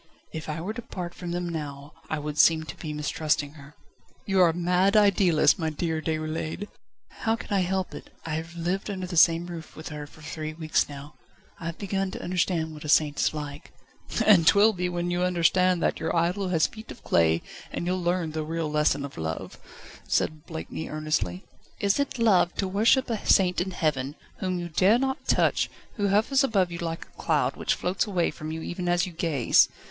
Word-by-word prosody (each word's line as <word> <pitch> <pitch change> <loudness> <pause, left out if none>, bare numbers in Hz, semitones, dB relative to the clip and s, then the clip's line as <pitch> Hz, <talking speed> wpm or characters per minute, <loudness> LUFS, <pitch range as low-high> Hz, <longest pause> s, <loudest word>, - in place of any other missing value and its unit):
"If 160 0 -6
I 155 +1 -3
were 200 +6 -3
to 240 - -6
part 175 -6 -6
from 175 -1 -7
them 175 0 -2
now 145 -3 -6 0.2
I 155 - -1
would 150 0 -4
seem 160 -1 +5
to 155 - -8
be 155 - -6
mistrusting 150 -1 -1
her." 145 -1 -14 0.5
"You 195 -1 +3
are 175 - +7
a - - 0
mad 180 +4 +2
idealist, 195 -4 +4
my 160 -2 0
dear 160 +1 -2
Déroulède!" 155 +4 -3 0.5
"How 225 -1 +1
can 225 - -6
I - - +3
help 190 +1 -1
it? - - -9 0.2
I 160 - -3
have 165 +2 -4
lived 180 +5 -2
under 190 -2 -3
the 180 -1 -6
same 165 +1 +5
roof 170 -3 -8
with 155 - -8
her 150 -1 -7
for 155 - -17
three 155 0 -5
weeks 155 -2 0
now. 145 +1 -9 0.5
I 165 - -5
have 165 - -5
begun 195 -1 -2
to - - -7
understand 175 -3 0
what 150 - -10
a 150 - -5
saint 145 -2 +3
is - - +3
like." 145 -1 -7 0.5
"And 180 -7 +6
'twill 210 +4 +6
be 180 -1 -2
when 175 0 -2
you 175 0 0
understand 180 0 +3
that - - +1
your - - -1
idol 180 +4 +1
has 165 -3 +3
feet 220 0 -8
of - - -10
clay 80 0 +2 0.3
that - - -3
you'll 185 +1 -1
learn 175 -2 0
the 155 0 -3
real 160 0 -3
lesson 150 -2 +2
of 140 - -9
love," 80 0 -5 0.5
said 155 -1 -1
Blakeney 160 0 -6
earnestly. 150 -13 -2 0.4
"Is 200 +4 +2
it 280 -2 -1
love 190 -7 +3
to 195 - -1
worship 220 +7 +3
a 220 - -2
saint 180 -2 +4
in 185 - -2
heaven, 150 -6 -1 0.2
whom 185 -1 -1
you 175 -1 -4
dare 185 +7 +4
not 265 +1 -2
touch, - - +2 0.3
who 205 -1 +1
hovers 220 +8 +3
above 195 -9 +2
you 170 - -5
like 165 -1 -4
a - - -15
cloud, - - +1
which - - 0
floats 180 +4 -1
away 180 -4 +1
from 155 0 -7
you 160 0 -5
even 175 0 -3
as 175 0 +2
you 185 - -7
gaze? 160 -7 +3
170 Hz, 210 wpm, -26 LUFS, 155-185 Hz, 0.5 s, are